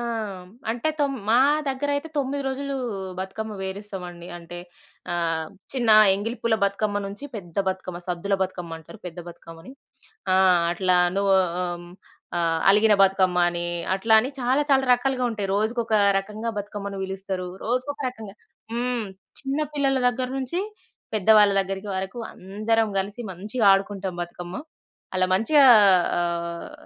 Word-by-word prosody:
ఆ! - - -3
హ్మ్. 210 -6 -5 0.2
అంటే, 240 +6 -1
తొమ్ 280 -2 0
మా 235 - +5 0.3
దగ్గరయితే 285 +3 -1
9 280 +1 -1
రోజులూ 275 +1 -3 0.4
బతుకమ్మ 210 +3 -5
వేరిస్తామండి. 190 -3 -7
అంటే, 175 0 -9 0.5
ఆహ్, 165 -2 -1 0.2
చిన్న 245 -4 +1 0.2
ఎంగిలి 220 +5 -3
పూల 235 -1 +2
బతుకమ్మ 205 +1 -1
నుంచి, 200 +7 -8
పెద్ద 175 -5 -10
బతుకమ్మ, 185 -2 -4
సద్దుల 180 +2 -1
బతుకమ్మంటరు 170 0 -6
పెద్ద 175 0 -8
బతుకమ్మని. 165 +4 -12 0.6
ఆ! - - +4 0.4
అట్లా 185 0 +2 0.2
నువ్వు 200 -1 +3 0.3
ఆ! - - 0 0.2
హ్మ్. 175 0 -13 0.4
ఆహ్, 165 -1 +1
అలిగిన 210 +1 +5
బతుకమ్మ 190 -2 +3
అనీ, 175 0 -3 0.3
అట్లా 220 +3 +2
అని, 250 - -3
చాలా, 255 +4 +2
చాలా 265 -1 +4
రకాలుగా 255 0 +1
ఉంటాయి. 205 -3 -3
రోజుకోక 220 +2 0 0.2
రకంగా 210 +4 -4
బతుకమ్మని 200 -1 -5
బిలుస్తరూ. 190 -1 -4 0.2
రోజుకొక 255 +5 -2
రకంగా, 220 -5 -10 0.4
హ్మ్. 245 -1 -1 0.4
చిన్న 275 +2 -2
పిల్లల 275 -2 +2
దగ్గర్నుంచి, 260 +5 -2 0.6
పెద్దవాళ్ళ 210 0 +5
దగ్గరికి 195 +1 -4
వరకు, 190 +5 -4
అందరం 215 +4 -1
గలిసి 200 +5 -3
మంచిగా 210 +5 -2
ఆడుకుంటాం 195 -2 -1
బతుకమ్మ. 175 +1 -7 0.6
అలా 185 0 +3
మంచిగా 275 +8 +5 0.5
ఆహ్, 170 - -3
205 Hz, 130 wpm, -24 LUFS, 185-240 Hz, 0.6 s, మా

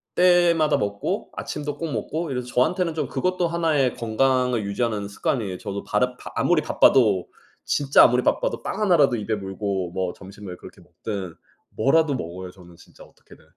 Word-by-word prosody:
때마다 175 -3 +4
먹고 100 0 -3
아침도 150 -1 -5
꼭 165 -2 -4
먹고 160 +1 -3
이래서 125 -1 -3
저한테는 165 +8 +1
좀 160 - -2
그것도 185 -1 -1
하나의 155 -7 +1
건강을 125 0 +1
유지하는 105 0 -2
습관이에요. 100 -2 -2
저도 100 -2 -5
바르 125 +4 0
바 - - -9
아무리 175 -3 +2
바빠도 105 -11 +3 0.4
진짜 140 -1 +5
아무리 125 +1 +4
바빠도 - - 0
빵 - - -4
하나라도 155 -11 +4
입에 110 +1 -3
물고 95 -2 -3
뭐 90 -1 -2
점심을 95 -1 -10
그렇게 - - -14
먹든 95 -6 -6 0.4
뭐라도 145 +5 +2
먹어요 90 -2 -6
저는 90 -2 -16
진짜 - - -17
어떻게든. - - -20
125 Hz, 390 characters per minute, -23 LUFS, 100-155 Hz, 0.4 s, 진짜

